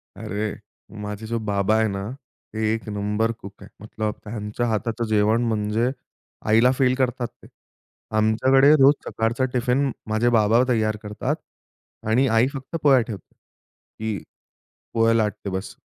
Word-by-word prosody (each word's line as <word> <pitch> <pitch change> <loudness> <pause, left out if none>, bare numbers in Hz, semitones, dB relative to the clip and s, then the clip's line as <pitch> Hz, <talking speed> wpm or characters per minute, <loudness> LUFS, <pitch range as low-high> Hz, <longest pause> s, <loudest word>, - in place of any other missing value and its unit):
अरे, 105 +1 -4 0.4
माझे 105 +1 -6
जो 115 +1 -1
बाबा 105 -1 +1
आहे 110 0 +3
ना, 100 0 -4 0.4
ते 110 0 0
1 110 0 -5
नंबर 105 +2 0
कुक 100 -4 -10
आहे. - - -12
मतलब 110 0 -3
त्यांच्या 105 +2 -4
हाताचं 115 +1 -1
जेवण 110 +2 +3
म्हणजे 110 +1 0 0.6
आईला 115 +4 +5
फेल 130 -2 +3
करतात 125 -2 0
ते. - - -20 0.7
आमच्याकडे 130 +6 +4
रोज 135 +2 +8
सकाळचा 115 +3 0
टिफिन 125 +2 +1 0.2
माझे 110 +3 +2
बाबा 110 +3 +4
तयार 110 -3 +1
करतात 105 +7 -2 0.7
आणि 125 +5 +3
आई 115 +1 +3
फक्त 135 +3 -7
पोळ्या 135 -3 +6
ठेवते. 110 -6 -8
ती 110 -1 -9 0.8
पोळ्या 115 0 +4
लाटते 105 -3 -1
बस. 95 +1 -5
110 Hz, 140 wpm, -23 LUFS, 105-120 Hz, 0.8 s, रोज